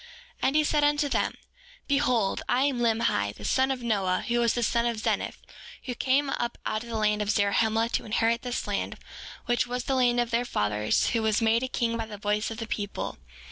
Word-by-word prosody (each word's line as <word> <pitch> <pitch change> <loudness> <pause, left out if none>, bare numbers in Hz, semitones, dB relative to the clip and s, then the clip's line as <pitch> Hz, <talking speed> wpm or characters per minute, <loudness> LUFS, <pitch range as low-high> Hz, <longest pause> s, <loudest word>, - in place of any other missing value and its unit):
7:9 - - +3
And 270 - 0
he 305 - +5
said 295 0 +2
unto 295 0 +3
them: - - 0 0.5
Behold, 250 -8 +1
I 255 +2 +3
am 275 -3 +1
Limhi, 225 - +1
the 105 - -9
son 260 - +2
of 260 -2 -2
Noah, 195 -5 0
who 240 0 +1
was 235 -1 +2
the 240 - 0
son 235 +1 +1
of 235 -1 -1
Zeniff, 215 - -1 0.5
who 255 - -4
came 270 +3 +1
up 240 0 -2
out 215 - -1
of 235 - -11
the 230 - -3
land 210 -1 +1
of 205 - -2
Zarahemla 220 +2 +2
to - - -2
inherit 230 +1 +1
this 245 -1 -3
land, - - -3 0.5
which 240 0 +1
was 245 0 -3
the 270 - -1
land 245 -2 +3
of 240 -1 0
their 235 +1 +2
fathers, 105 - 0
who 230 - 0
was 220 -1 +2
made 225 0 +3
a 260 - -1
king 235 -2 -1
by 225 -1 -4
the 210 -1 -8
voice 210 +1 -1
of 225 - -6
the 225 - -4
people. 205 - -4
235 Hz, 225 wpm, -27 LUFS, 215-250 Hz, 0.5 s, he